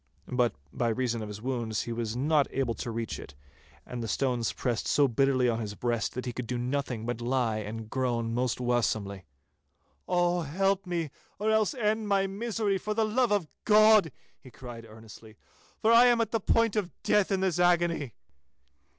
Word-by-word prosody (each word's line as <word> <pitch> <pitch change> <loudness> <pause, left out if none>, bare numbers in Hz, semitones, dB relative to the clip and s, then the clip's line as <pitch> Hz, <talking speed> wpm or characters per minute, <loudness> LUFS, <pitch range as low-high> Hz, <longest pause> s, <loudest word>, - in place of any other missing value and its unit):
But, 125 - +1 0.2
by 120 - 0
reason 120 0 -1
of 105 - -5
his 105 +1 -8
wounds, 120 -4 -2
he 120 - -6
was 115 -1 -3
not 145 +3 +2
able 130 -3 -1
to 120 - -5
reach 115 0 -4
it, 70 - -11 0.5
and 125 -1 -6
the 115 - -3
stones 125 -2 0
pressed 120 -3 -2
so 145 -1 +4
bitterly 130 +1 +2
on 115 -1 0
his 105 -2 -5
breast 120 -1 -2
that 125 - -4
he 125 - -3
could 120 0 -5
do 125 - -2
nothing 125 -2 -2
but 120 0 -3
lie 120 -2 0
and 110 +1 -6
groan 120 -2 -1
most 125 0 -1
waesomely. 110 -6 -1 0.8
'Oh, 175 -1 +2
help 195 +5 0
me, 170 -5 -2 0.3
or 215 +2 0
else 220 +4 +2
end 220 -2 0
my 195 -1 +2
misery—for 210 0 -2
the 220 0 +2
love 235 +2 +1
of 200 -6 +1 0.2
God,' 215 -5 +6 0.3
he 130 - -14
cried 120 -2 -10
earnestly, 110 0 -13 0.5
'for 220 - +5
I 235 +2 +8
am 240 -1 +4
at 230 - 0
the 225 - +1
point 230 +1 +2
of 205 -5 0
death 210 -1 +2
in 190 -1 +1
this 185 -3 0
agony. 175 -7 +2
130 Hz, 185 wpm, -28 LUFS, 115-195 Hz, 0.8 s, I